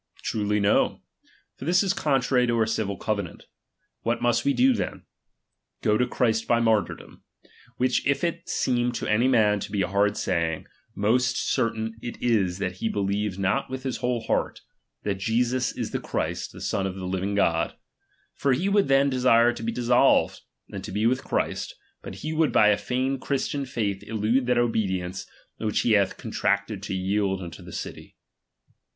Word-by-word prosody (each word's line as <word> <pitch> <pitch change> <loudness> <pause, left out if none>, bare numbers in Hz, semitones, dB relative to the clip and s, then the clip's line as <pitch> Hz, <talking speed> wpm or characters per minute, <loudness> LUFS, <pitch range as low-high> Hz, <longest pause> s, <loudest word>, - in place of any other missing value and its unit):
Truly, 105 -1 0
no; 100 0 +2 0.5
for - - -8
this 180 +4 +3
is 195 -1 +1
contrary 135 -6 +2
to 120 - +1
our 110 - +3
civil 110 -3 -2
covenaDt. 100 -4 -3 0.6
What 115 +1 0
must 120 0 +2
we 140 - +3
do 260 +1 +5
then? - - -4 0.8
Go 105 - +3
to 125 +3 +2
Christ 110 -2 0
by 120 - +3
martyrdom; 110 -3 -1 0.5
which 125 0 +1
if 140 +2 +1
it 170 0 -2
seem 120 -1 +1
to - - -4
any 110 +4 +2
man 105 -5 +3
to - - -6
be 100 -2 +1
a - - -1
hard 100 +2 +1
saying, 80 -1 -1 0.3
most 125 +5 +2
certain 115 -3 -1
it 120 - -6
is 100 -7 +1
that 90 -2 -3
he 110 - -1
beheves 100 -1 -1
not 100 +8 0
with 130 0 -5
his 130 -2 -2
whole 125 -1 -1
heart, 110 - -1 0.4
that 100 -2 -2
Jesus 120 +4 0
Ix - - -3
the - - -2
Christ, - - -3
the - - -12
Son 95 -1 -1
of 95 - -5
the 95 -1 -6
living 95 +2 -2
God; 85 -4 +1 0.6
for 140 - +1
he 175 +10 0
would 200 0 +3
then 135 +1 +4
desire 125 -3 +4
to 120 - -8
be 115 0 -1
dissolved, 120 0 +3 0.3
and - - -6
to - - -6
he 105 +3 0
with 125 +2 +2
Christ; - - -2 0.3
but - - -8
he 155 - -2
would 160 -2 +2
by 105 - +5
a 105 - +3
feigned 130 +1 -1
Christian 140 0 -2
faith 105 -7 -2
elude 115 +4 0
that 125 -1 +2
obedience, 95 -6 -1 0.3
which 110 -2 0
he 120 - +1
hath 100 -3 +3
contracted 100 0 -1
to 95 -1 -4
yield 95 +1 0
unto 85 -4 -8
the - - -11
city. - - -7
115 Hz, 180 wpm, -25 LUFS, 100-125 Hz, 0.8 s, do